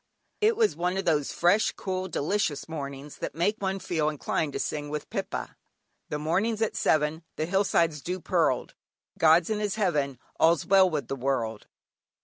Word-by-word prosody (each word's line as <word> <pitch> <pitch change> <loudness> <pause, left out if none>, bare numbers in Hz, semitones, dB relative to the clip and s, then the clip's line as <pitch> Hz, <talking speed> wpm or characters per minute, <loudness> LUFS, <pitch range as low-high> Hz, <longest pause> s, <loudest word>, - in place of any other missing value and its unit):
It 435 +1 +3
was 445 -2 +3
one 180 +2 -1
of 195 - -2
those 150 -4 +1
fresh, 180 +5 +3
cool, 185 -1 -3
delicious 155 -3 -1
mornings 140 -2 -6
that - - -4
make 200 +6 +1
one 195 0 -1
feel 165 -5 0
inclined 150 0 -2
to - - -3
sing 145 -1 -3
with 150 0 -5
Pippa: - - -4 0.5
"The 150 - -2
morning's 200 +9 0
at 220 - -1
seven, 155 +1 +1
The 155 - -1
hillside's 170 -4 +1
dew 180 +4 -3
pearled." 165 -7 0 0.5
"God's 165 +4 +5
in 215 - 0
His 210 -1 -1
Heaven, 150 - 0 0.2
all's 165 -2 +4
well 190 -1 +5
with 150 -4 -3
the 135 - -3
World." 120 -5 -2
165 Hz, 170 wpm, -27 LUFS, 150-190 Hz, 0.5 s, God's